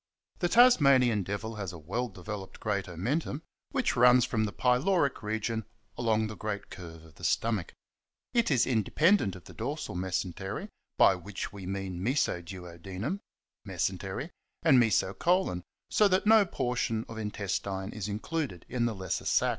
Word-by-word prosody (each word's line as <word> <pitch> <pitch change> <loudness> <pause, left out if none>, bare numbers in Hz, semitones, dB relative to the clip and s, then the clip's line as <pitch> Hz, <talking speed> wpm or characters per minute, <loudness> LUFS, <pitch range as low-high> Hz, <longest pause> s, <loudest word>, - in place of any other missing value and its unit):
The 175 - +1
Tasmanian 140 - +6
Devil 100 +4 -4
has 100 -4 -4
a 90 - -9
well 100 +11 -3
developed 95 0 -7
great 100 -3 -1
omentum, 135 - -2 0.3
which 265 -3 0
runs 125 0 +6
from 110 -2 0
the 105 - -3
pyloric 135 - +2
region 110 +1 -2 0.3
along 110 -2 +1
the 110 0 -5
great 105 -1 -5
curve 80 -3 -9
of 80 -1 -16
the - - -16
stomach. 110 -6 0 0.6
It 235 -2 +3
is 130 -6 +3
independent 130 - +2
of 90 - -11
the - - -13
dorsal - - -4
mesentery, 95 +1 -3 0.3
by - - +7
which 95 +3 -6
we 95 -3 -8
mean 95 -2 -4
meso 120 -7 +1
duodenum— 95 - -6 0.4
mesentery - - -3 0.2
— - - -36
and 130 - +6
mesocolon, 115 - +2 0.3
so 210 - +5
that 190 +1 +2
no 215 -2 +6
portion 120 -5 -1
of 110 -1 -7
intestine 100 -2 -3
is 105 -2 -4
included 110 - -3
in 120 -2 0
the 115 - -3
lesser 95 -2 -3
sac. - - +3
110 Hz, 155 wpm, -30 LUFS, 95-130 Hz, 0.6 s, by